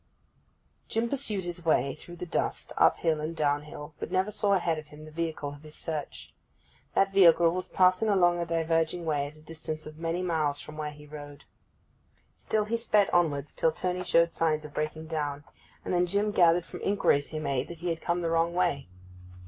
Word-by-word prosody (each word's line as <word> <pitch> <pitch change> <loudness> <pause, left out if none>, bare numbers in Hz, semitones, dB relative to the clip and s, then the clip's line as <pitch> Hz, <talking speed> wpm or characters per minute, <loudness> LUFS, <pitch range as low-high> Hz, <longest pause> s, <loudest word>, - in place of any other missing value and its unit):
Jim 225 +1 0
pursued 230 -7 -1
his 175 0 -4
way 140 -4 +2
through 175 +3 -11
the 175 - -6
dust, 170 - -2
up - - +4
hill 160 -2 0
and 160 +2 -4
down 145 -2 +1
hill; 150 0 -9
but - - -5
never 190 +3 +1
saw 205 -1 +2
ahead 170 -4 +1
of 155 - -11
him 150 +1 -12
the 155 - -11
vehicle 160 -2 -3
of 145 0 -11
his 155 0 -12
search. 155 -3 -5 0.6
That 195 0 +3
vehicle 170 -3 +6
was 185 +1 -4
passing 185 +4 +3
along 175 -3 +4
a 170 - -1
diverging 165 +1 0
way 145 -3 0
at 150 - -12
a 155 - -17
distance 155 0 -6
of 155 +1 -10
many 170 +2 -1
miles 155 -5 0
from 150 - -9
where 155 -1 -3
he 150 0 -12
rode. 145 -1 -10 1.0
Still 215 -1 0
he 230 +2 0
sped 210 -3 +2
onwards, 150 -5 +1
till 160 - +2
Tony 180 +2 -2
showed 170 -1 +3
signs 155 -2 0
of 150 - -10
breaking 155 +1 -3
down; 145 -3 -3 0.4
and - - -2
then 180 0 +3
Jim 200 +3 +1
gathered 175 -3 +4
from - - -9
inquiries 170 -8 +2
he 155 - -5
made 140 -3 -1
that 170 - -8
he 175 - -1
had 165 -1 -2
come 175 0 -1
the 165 - 0
wrong 165 +1 +1
way. 175 - +1
165 Hz, 205 wpm, -28 LUFS, 150-180 Hz, 1.0 s, vehicle